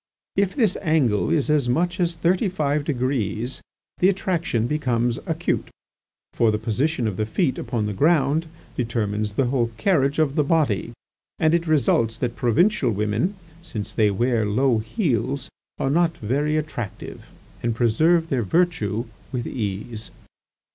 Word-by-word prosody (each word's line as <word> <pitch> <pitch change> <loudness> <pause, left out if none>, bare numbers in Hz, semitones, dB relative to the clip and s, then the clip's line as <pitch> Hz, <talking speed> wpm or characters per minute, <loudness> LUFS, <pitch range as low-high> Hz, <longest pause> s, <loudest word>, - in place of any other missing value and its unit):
If 200 -1 +1
this 220 -9 +2
angle 145 - +2
is 150 -5 +1
as 145 -5 +2
much 175 +8 0
as 175 -1 +1
thirty 180 +5 +1
five 150 -5 0
degrees, 125 - -2 0.4
the 185 - +5
attraction 170 - 0
becomes 120 -3 0
acute. 165 +1 -1 0.7
For 115 - +3
the 105 - +1
position 125 +5 -1
of 105 -4 -2
the 110 - 0
feet 135 - 0
upon 115 -3 -2
the 105 - -2
ground 155 - +2 0.3
determines 105 -3 -1
the 135 +5 +1
whole 120 -2 +1
carriage 140 - +2
of 155 -4 +2
the 150 - +3
body, 140 - +1 0.5
and 160 0 +2
it 170 0 +1
results 115 -7 +2
that 120 -1 -2
provincial 140 - +2
women, 105 - 0 0.3
since 110 - -5
they 110 -2 +3
wear 115 +3 +1
low 115 +3 +2
heels, 130 - -1 0.3
are 135 - 0
not 170 +1 +2
very 145 +8 0
attractive, 135 -9 -5 0.3
and 115 -1 -1
preserve 160 +9 +3
their 130 -3 +1
virtue 115 - 0 0.3
with 125 -3 -3
ease." 110 0 -4
130 Hz, 150 wpm, -23 LUFS, 115-160 Hz, 0.7 s, the